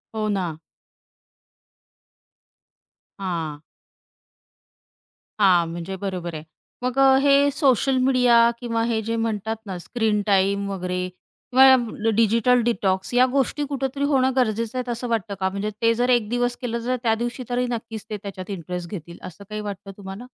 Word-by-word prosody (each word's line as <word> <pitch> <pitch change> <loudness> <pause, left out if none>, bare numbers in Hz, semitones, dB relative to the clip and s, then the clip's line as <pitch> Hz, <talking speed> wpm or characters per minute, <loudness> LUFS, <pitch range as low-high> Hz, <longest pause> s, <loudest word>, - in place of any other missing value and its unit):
हो 215 -1 -1
ना. 180 -6 -2 2.6
हां. 165 -6 -3 1.8
हां, 180 -4 +4
म्हणजे 170 +3 -5
बरोबर 180 -4 -4
आहे 155 - -6 0.4
मग 255 +1 -2 0.2
हे 280 0 +5
सोशल 270 -2 +2
मीडिया 255 -2 +4 0.2
किंवा 230 -2 -1
हे 225 -2 0
जे 225 +1 -2
म्हणतात 220 -1 -2
ना 190 -3 -5
स्क्रीनटाईम 200 -2 +1
वगैरे 180 -1 -3 0.5
किंवा 265 0 +9 0.3
ड - - +1
डिजिटल 230 +3 +3
डिटॉक्स 195 -4 0
या 250 +1 +6
गोष्टी 280 +2 0
कुठेतरी 275 0 -3
होणं 265 -2 +3
गरजेचं 230 -1 0
आहे, 250 -1 -2
असं 240 +1 -4
वाटतं 220 -3 -1
का? 190 0 +1
म्हणजे 200 +2 -3
ते 230 0 +4
जर 245 +2 0
1 235 -4 +2
दिवस 245 0 0
केलं, 235 -1 -3
तर 255 - +1
त्यादिवशी 235 +2 -1
तरी 245 +1 0
नक्कीच 225 -2 -5
ते 210 - -3
त्याच्यात 190 -1 -7
इंटरेस्ट 180 -1 -5
घेतील 170 -3 -8
असं 185 +3 -9
काही 210 0 -4
वाटतं 200 -1 -7
तुम्हाला? 195 +4 -8
220 Hz, 145 wpm, -23 LUFS, 195-245 Hz, 2.6 s, किंवा